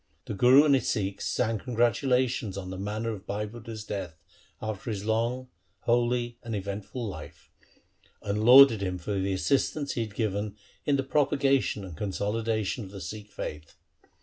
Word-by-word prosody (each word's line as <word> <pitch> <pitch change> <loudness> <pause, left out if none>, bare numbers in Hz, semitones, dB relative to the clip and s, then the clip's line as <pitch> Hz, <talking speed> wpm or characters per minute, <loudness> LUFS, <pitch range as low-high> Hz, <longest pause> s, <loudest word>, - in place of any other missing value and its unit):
The - - -4
Guru 125 +8 +7
and 145 - +5
his 130 -4 +2
Sikhs 100 -2 -2
sang 115 -3 0
con 125 +1 -6
gratulations 120 -2 +1
on 95 -1 -5
the 95 - -5
manner 105 +3 -2
of 100 -2 -8
Bhai 105 +1 -2
Budha's 110 0 -8
death 95 -6 -5 0.4
after 110 +1 -5
his 105 -2 -3
long, 120 +3 0 0.3
holy, 120 0 +1
and 115 -2 -4
eventful 100 +5 -4
life, 95 - -9 0.7
and 105 +1 -1
lauded 125 -2 +8
him 90 -2 -2
for 95 +3 -3
the 95 +1 0
assistance 140 +7 0
he 120 - -2
had 110 -3 -5
given 105 -1 -2 0.3
in 145 - +3
the 135 - 0
propaga 140 -1 +2
tion 100 - -3
and 90 -4 -9
consolidation 105 +4 -1
of 95 - -9
the 100 0 -9
Sikh 105 +2 -7
faith. 75 -5 -7
110 Hz, 175 wpm, -28 LUFS, 100-125 Hz, 0.7 s, lauded